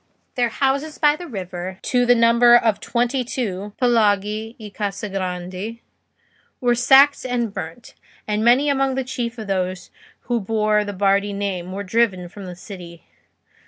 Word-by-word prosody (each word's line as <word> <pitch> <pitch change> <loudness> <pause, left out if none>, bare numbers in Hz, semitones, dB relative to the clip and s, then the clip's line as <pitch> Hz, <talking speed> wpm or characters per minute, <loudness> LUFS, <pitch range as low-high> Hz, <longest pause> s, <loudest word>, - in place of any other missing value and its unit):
Their 245 -1 +1
houses 280 +5 -1
by 295 -1 +4
the 350 +3 -9
river, 185 - -6
to 245 -1 +1
the 245 - +6
number 235 +1 +6
of 225 -3 +1
twenty 245 +2 -1
two 210 -6 -4
(palagi 220 -2 +1
e 215 -2 -10
case 200 +1 -4
grandi), 185 +3 -5 0.8
were 245 -1 +2
sacked 270 +4 +5
and 240 -4 -2
burnt, 165 +8 -8 0.3
and 210 0 0
many 250 +5 +4
among 270 -2 +1
the 265 - -1
chief 245 -2 -4
of 220 - -6
those 185 -2 -3 0.3
who 240 -1 -1
bore 215 0 +1
the 205 - -5
Bardi 200 +1 +1
name 190 -3 -3
were 200 +2 -4
driven 190 -3 0
from 200 +2 -10
the 180 - -7
city. 175 -3 -11
220 Hz, 160 wpm, -21 LUFS, 195-245 Hz, 0.8 s, the